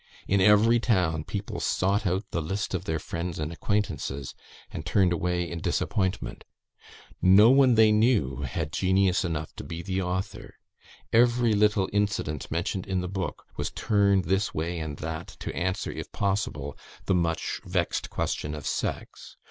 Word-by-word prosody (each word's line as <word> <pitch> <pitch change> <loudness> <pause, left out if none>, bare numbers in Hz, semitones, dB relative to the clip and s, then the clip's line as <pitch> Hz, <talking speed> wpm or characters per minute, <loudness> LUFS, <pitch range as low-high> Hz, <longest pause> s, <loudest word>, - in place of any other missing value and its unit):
In 100 0 +3
every 105 +4 +5
town 90 -9 +1
people 100 -1 -4
sought 100 +2 +1
out 95 +4 0
the 85 - -1
list 95 +6 -3
of 95 0 -2
their 80 -3 -1
friends 85 +2 -4
and 75 +2 -3
acquaintances, 80 -9 -2 0.4
and - - -5
turned 95 -4 +2
away 90 +1 -1
in 85 0 -5
disappointment. 95 - -1 0.8
No 100 +6 +7
one 135 -3 +5
they 110 -1 +6
knew 105 - +2
had 75 +3 -3
genius 95 0 +2
enough 80 -3 -3
to - - -6
be 85 0 -6
the 95 +2 -1
author. 95 +2 -4 0.6
Every 120 0 +4
little 105 -2 +3
incident 100 -8 -1
mentioned 85 +3 -2
in 95 -1 0
the 90 - -3
book 95 -1 -4
was - - -2
turned 100 -2 +2
this 95 +4 0
way 85 +2 -2
and 75 -3 -5
that 80 +1 -5
to - - -6
answer, 95 +2 -1
if - - -7
possible, 95 -8 -2 0.3
the - - +2
much 85 -2 -1
vexed - - -1
question 75 +1 -2
of 75 - -8
sex. - - -4
95 Hz, 160 wpm, -27 LUFS, 80-105 Hz, 0.8 s, No